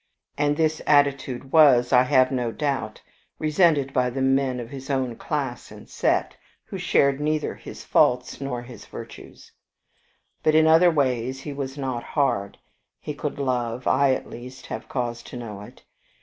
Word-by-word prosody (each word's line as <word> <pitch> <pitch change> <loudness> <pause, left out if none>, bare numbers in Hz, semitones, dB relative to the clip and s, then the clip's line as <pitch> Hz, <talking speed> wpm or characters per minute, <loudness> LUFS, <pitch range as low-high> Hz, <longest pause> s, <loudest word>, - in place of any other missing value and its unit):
And 145 0 +1
this 155 -1 +1
attitude 140 -3 +2
was, 135 -6 +5
I 125 - +7
have 130 0 +3
no 125 -3 -1
doubt, 135 -6 -3 0.3
resented 155 -3 +2
by 125 -1 +2
the 130 +2 -3
men 135 -1 +1
of 120 -1 -7
his 135 0 -9
own 130 -4 -1
class - - -4
and - - -12
set, - - 0 0.3
who - - -7
shared 140 0 +2
neither 155 0 -1
his - - -11
faults 125 +1 +2
nor 125 -3 -4
his 120 -3 -12
virtues. - - -11 0.9
But 155 - +2
in 160 0 +6
other 165 +3 +6
ways 130 -4 0
he 145 - -6
was 135 0 -5
not 130 -4 -3
hard. 120 -10 -1 0.4
He 150 - -5
could 145 0 -5
love; 125 -3 -2
I, 135 0 +3
at - - -7
least, 125 +2 -10
have - - -7
cause 120 -2 -3
to 125 - -10
know 105 -4 -7
it. 105 - -14
135 Hz, 165 wpm, -24 LUFS, 125-145 Hz, 0.9 s, I